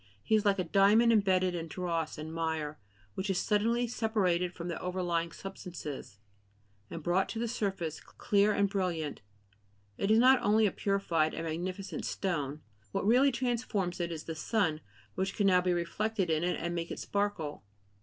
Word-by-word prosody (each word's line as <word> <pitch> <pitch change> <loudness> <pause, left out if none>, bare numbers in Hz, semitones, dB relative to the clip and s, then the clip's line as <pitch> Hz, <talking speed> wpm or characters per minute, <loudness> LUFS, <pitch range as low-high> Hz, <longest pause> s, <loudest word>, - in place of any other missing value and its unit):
He - - -1
is 215 -1 +4
like 200 -1 +4
a 185 - +1
diamond 205 +6 +5
embedded 185 -4 +3
in 165 -1 -4
dross 165 -2 -2
and 155 +1 -6
mire 160 -2 -2 0.3
which 190 +2 -3
is 190 - +1
suddenly 230 +5 +2
separated 200 -7 0
from 175 0 -7
the 170 - -4
overlying 175 -2 -1
substances, 175 - -7 0.7
and 165 -2 -7
brought 180 +3 +1
to - - -5
the 235 +1 -1
surface, 195 -8 -2
clear 205 0 +1
and 200 -1 +2
brilliant; 180 -7 -2 0.8
it 195 - 0
is 220 - +6
not 255 +2 +6
only 215 +2 +4
a 200 - +2
purified 175 -7 0
and 165 - -4
magnificent 180 +4 -4
stone; 150 -6 -2 0.3
what - - -1
really 255 +6 +5
transforms 235 -8 -1
it 170 -1 -2
is 160 -2 -5
the 165 - -5
sun, 160 -2 0 0.3
which 190 +1 -2
can 205 - +1
now 180 -2 +5
be 180 0 +1
reflected 185 +2 -1
in 160 +1 +1
it 180 - 0
and 170 +1 -2
make 170 -1 -3
it - - -5
sparkle. 200 -7 -2
185 Hz, 175 wpm, -31 LUFS, 165-205 Hz, 0.8 s, is